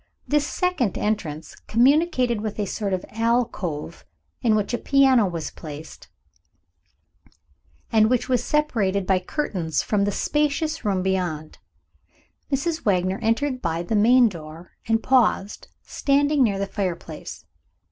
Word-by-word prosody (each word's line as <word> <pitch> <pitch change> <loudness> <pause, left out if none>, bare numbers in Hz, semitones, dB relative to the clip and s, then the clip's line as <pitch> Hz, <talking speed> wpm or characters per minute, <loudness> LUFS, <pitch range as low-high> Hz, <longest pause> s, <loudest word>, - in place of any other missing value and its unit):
This 295 0 +1
second 360 - -1
entrance 165 -8 -3
communicated 250 -2 +3
with 215 -1 -4
a 205 - 0
sort 200 +1 -3
of 185 -1 -2
alcove, 220 -9 -2 0.4
in 220 -2 +3
which 210 +2 -1
a 240 - 0
piano 265 -6 +4
was 170 -3 -4
placed, 155 0 -10 1.8
and 220 -1 +4
which 250 -1 +1
was 255 -2 +2
only - - -9 0.2
separated 200 -9 -1
by 190 0 +2
curtains 180 - -2
from 200 -2 +1
the 205 - 0
spacious 300 - -1
room 195 -4 0
beyond. 175 -5 -2 0.9
Mrs. 315 +4 -1
Wagner 185 -1 +1
entered 255 +4 0
by 165 0 -2
the 220 +5 -2
main 240 +4 +6
door, 165 -2 -9 0.2
and 225 0 +1
paused, 230 -6 +1 0.2
standing 285 +1 +1
near 210 -6 +3
the 200 - -1
fire 195 -3 -2
place. 160 -2 -10
215 Hz, 135 wpm, -23 LUFS, 185-255 Hz, 1.8 s, main